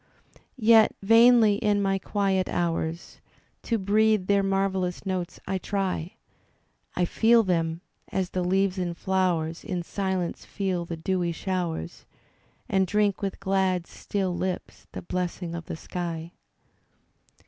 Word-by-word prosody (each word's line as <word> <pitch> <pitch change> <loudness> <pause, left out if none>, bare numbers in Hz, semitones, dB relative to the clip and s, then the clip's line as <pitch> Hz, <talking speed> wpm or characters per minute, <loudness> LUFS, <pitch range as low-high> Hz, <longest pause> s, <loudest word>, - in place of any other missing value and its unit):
Yet, 225 -2 +5
vainly 225 -1 +6
in 205 -1 +1
my 195 -1 +1
quiet 195 -1 0
hours 165 -1 -2 0.4
To 230 - 0
breathe 215 0 +2
their 200 +1 +3
marvellous 195 -1 -1
notes 185 -2 -3
I 190 - -2
try; 190 -4 -2 0.8
I 180 - +2
fed 230 +4 +4
them, 165 -2 0 0.3
as 185 -1 -1
the 185 - -1
leaves 190 +1 +1
and 175 -2 -3
flowers 175 -4 0
In 180 -5 -3
silence 190 -1 -2
fed 185 -4 -3
the 165 - -5
dewy 175 +1 -1
showers. 170 - -4 0.6
And 190 -1 +2
drink 205 0 +1
with 195 -1 -3
glad, 190 -2 +1
still 190 -1 -3
lips 185 0 -4
the - - -7
blessing 180 -1 -3
of 170 -1 -6
the - - -6
sky. 170 -1 -5
190 Hz, 130 wpm, -26 LUFS, 175-200 Hz, 0.8 s, vainly